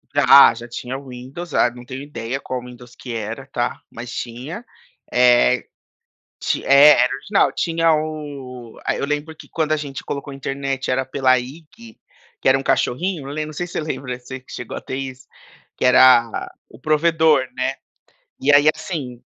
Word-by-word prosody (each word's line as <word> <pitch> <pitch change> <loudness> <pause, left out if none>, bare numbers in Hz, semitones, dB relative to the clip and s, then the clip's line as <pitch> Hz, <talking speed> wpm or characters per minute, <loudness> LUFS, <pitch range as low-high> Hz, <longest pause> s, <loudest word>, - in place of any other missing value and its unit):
Já, 140 -3 +8
já 120 +1 -9
tinha 125 +2 -6
o 135 0 -12
Windows, 130 +7 -8
ah, 120 - +4
não 120 0 -13
tenho 130 +2 -7
ideia 135 -2 -5
qual 130 -2 -5
Windows 125 0 -13
que 125 -2 -8
era, 115 +5 -5
tá, 120 -3 -2
mas 120 +1 -8
tinha. 130 - -6 0.5
Eh, 125 0 +4 0.8
ti - - -1
é, 140 0 +7
era 125 - +1
original. 195 +9 +1
Tinha 165 -1 +1
o 145 -6 -5
eh, - - 0
eu - - -1
lembro 150 +2 -3
que - - -14
quando 155 -2 -1
a 155 - +3
gente 140 -3 -7
colocou 140 0 -5
internet, 135 0 -4
era 130 +1 +1
pela 130 -1 +2
IG, 170 - -11 0.4
que - - +1
era 135 - +6
um - - -5
cachorrinho, 155 +4 -1
eu 140 - -6
lem 155 0 -3
não 155 - -8
sei 175 +4 -4
se 175 - -13
você - - -2
lembra, 135 -5 -4
você 130 +1 -8
que 130 - -16
chegou 125 - -6
a - - -5
ter 130 - -6
isso, 130 -1 -7 0.5
que - - -3
era 125 -2 +5 0.2
o - - -16
provedor, 155 -2 +3
né. 130 - 0 0.7
E 145 +2 +4
aí 145 +1 +6
assim, 150 -7 -6
135 Hz, 185 wpm, -20 LUFS, 125-155 Hz, 0.8 s, Já